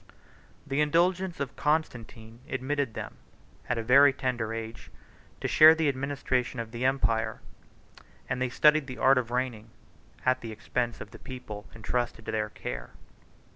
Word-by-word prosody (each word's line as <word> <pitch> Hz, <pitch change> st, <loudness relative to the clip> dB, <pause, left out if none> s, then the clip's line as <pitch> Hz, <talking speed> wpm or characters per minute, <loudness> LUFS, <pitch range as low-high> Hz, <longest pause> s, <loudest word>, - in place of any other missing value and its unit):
The 135 Hz, +2 st, 0 dB
indulgence 175 Hz, +4 st, +1 dB
of 140 Hz, -, -4 dB
Constantine 120 Hz, -7 st, -2 dB
admitted 130 Hz, -1 st, -2 dB
them, -, -, -6 dB, 0.5 s
at 120 Hz, -, 0 dB
a 115 Hz, -, -2 dB
very 140 Hz, +4 st, +7 dB
tender 125 Hz, -5 st, -2 dB
age, 115 Hz, +1 st, -7 dB, 0.5 s
to -, -, -1 dB
share 155 Hz, +1 st, +8 dB
the 160 Hz, -1 st, +1 dB
administration 135 Hz, -3 st, -1 dB
of 115 Hz, -1 st, -5 dB
the 120 Hz, +1 st, -5 dB
empire; 115 Hz, -4 st, +1 dB, 0.9 s
and 125 Hz, 0 st, -2 dB
they 130 Hz, -, +1 dB
studied 150 Hz, +2 st, +4 dB
the 130 Hz, -, -7 dB
art 135 Hz, 0 st, +5 dB
of 120 Hz, -2 st, -4 dB
reigning, 120 Hz, -3 st, -2 dB, 0.6 s
at 130 Hz, 0 st, +2 dB
the 115 Hz, -, -6 dB
expense 120 Hz, +2 st, -3 dB
of 105 Hz, -, -9 dB
the 115 Hz, -, -12 dB
people 110 Hz, -5 st, -8 dB
intrusted 115 Hz, +1 st, -3 dB
to -, -, -3 dB
their 105 Hz, -1 st, -1 dB
care. -, -, -7 dB
125 Hz, 155 wpm, -28 LUFS, 115-140 Hz, 0.9 s, share